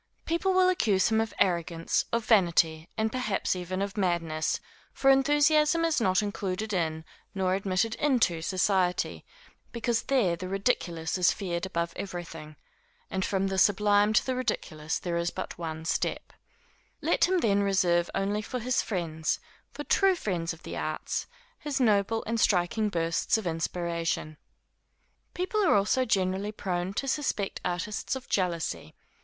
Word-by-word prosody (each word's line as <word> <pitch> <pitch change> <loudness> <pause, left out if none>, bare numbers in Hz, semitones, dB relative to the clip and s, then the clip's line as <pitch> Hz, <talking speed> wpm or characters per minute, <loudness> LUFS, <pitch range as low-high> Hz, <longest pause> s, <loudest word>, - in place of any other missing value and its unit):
People 340 +3 +1
will 370 0 +5
accuse 215 - +2
him 220 0 +3
of 225 - -3
arrogance, 170 -2 +1
of 230 -1 0
vanity, 170 -6 +3
and 220 0 0
perhaps 220 -7 -1
even 185 +2 -3
of 200 0 -5
madness; 170 -5 0 0.3
for 270 - +3
enthusiasm 300 +4 +4
is 320 -6 +1
not 185 0 +2
included 205 +1 -3
in, 160 -3 -1 0.3
nor 185 -1 +1
admitted 195 +3 0
into 240 - +2
society, 185 +1 0 0.5
because 235 0 0
there 230 -11 +1
the 185 +2 -6
ridiculous 185 -5 -1
is 180 - +5
feared 180 -2 -3
above 170 -2 -2
everything, 165 -5 -7 0.6
and 190 0 -1
from 195 0 0
the 195 -1 0
sublime 205 +1 +4
to 220 - +3
the 260 - 0
ridiculous 175 -11 -2
there 175 -1 -3
is 170 0 0
but 185 - -6
one 160 -1 -5
step. - - -2 0.7
Let - - +3
him, 370 +1 +1
then, 205 - +2
reserve 180 -3 +2
only 205 +2 0
for 250 +4 -5
his 250 +2 0
friends, 165 -5 -2 0.3
for - - -6
true 390 -1 +3
friends 175 - -2
of 165 0 -10
the - - -6
arts, - - -3 0.3
his 290 -2 -3
noble 220 -2 +2
and 230 +1 -1
striking 210 +2 +2
bursts 165 +2 +1
of 220 - -5
inspiration. 165 -1 -2 1.0
People 375 +4 0
are 355 - +4
also 210 +6 +2
generally 195 -2 0
prone 180 -3 -3
to 275 - -2
suspect 260 -8 -1
artists 180 +7 -2
of 265 - -8
jealousy. 175 -5 -2
195 Hz, 150 wpm, -28 LUFS, 175-225 Hz, 1.0 s, will